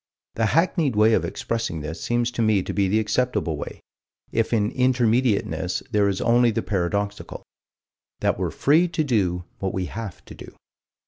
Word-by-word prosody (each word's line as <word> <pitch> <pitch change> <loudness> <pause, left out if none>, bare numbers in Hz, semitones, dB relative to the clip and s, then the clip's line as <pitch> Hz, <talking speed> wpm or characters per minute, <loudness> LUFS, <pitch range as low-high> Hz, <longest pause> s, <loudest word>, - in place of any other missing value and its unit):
The 115 -1 +1
hackneyed 160 - +1
way 110 +2 +5
of - - +2
expressing 115 -9 -3
this 80 +4 -6
seems 120 0 0
to 120 - -2
me 110 -4 +3
to - - -5
be 100 -1 +1
the 105 +4 +2
acceptable 110 -7 0
way, 75 - -7 0.5
if 115 -1 0
in 110 -2 +1
Intermediateness, 120 -7 +1
there 105 -2 +3
is 95 - -2
only 120 0 +4
the 110 - -1
paradoxical: 100 +1 -2 0.8
that - - +1
we're - - 0
free 160 +5 +3
to 165 -2 -1
do 95 -10 0 0.2
what 95 -1 -2
we 95 -1 -1
have 110 -1 -7
to - - -11
do. - - -12
110 Hz, 175 wpm, -23 LUFS, 100-120 Hz, 0.8 s, way